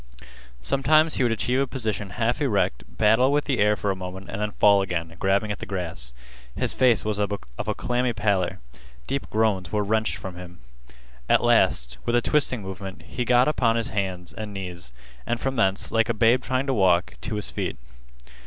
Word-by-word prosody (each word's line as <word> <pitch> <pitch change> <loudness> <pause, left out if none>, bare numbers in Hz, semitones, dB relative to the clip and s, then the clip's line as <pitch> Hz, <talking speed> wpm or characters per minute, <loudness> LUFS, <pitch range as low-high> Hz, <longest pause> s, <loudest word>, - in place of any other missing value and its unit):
Sometimes 155 - +3
he - - 0
would 120 - +2
achieve 125 +3 0
a 135 - +1
position 110 -6 -3
half 120 +5 0
erect, 100 - 0
battle 110 +8 +3
with 145 0 +1
the 135 -4 0
air 105 +1 +4
for 100 -1 -1
a - - -2
moment, 95 +1 -8
and 100 - -4
then 105 - 0
fall 100 -1 +5
again, 85 -3 -3
grabbing 100 +2 +1
at 105 - -4
the - - -6
grass. 85 -10 -3 0.4
His - - -1
face 120 -7 +3
was 105 -1 0
of 105 0 0
a 60 -12 -4
clammy 125 0 0
pallor. 100 -4 0 0.5
Deep 140 - -3
groans 105 -5 0
were 105 -1 +1
wrenched 110 +2 0
from 95 -3 -8
him. 90 -1 -10 0.7
At - - +4
last, - - +2
with 120 - 0
a 120 - +4
twisting 135 -7 +1
movement, 95 0 -7
he 125 - -4
got 125 +1 +4
upon 125 -6 +2
his 115 -1 0
hands 95 -4 -3
and 105 -2 -7
knees, 90 -7 -7 0.4
and 120 - -1
from 135 0 -2
thence, 100 -4 +1
like 115 0 +2
a 115 - 0
babe 115 +3 +4
trying 130 +1 -1
to 135 - 0
walk, 90 -5 +3
to 110 - -4
his 105 - -3
feet. - - -3
105 Hz, 200 wpm, -25 LUFS, 95-120 Hz, 0.7 s, fall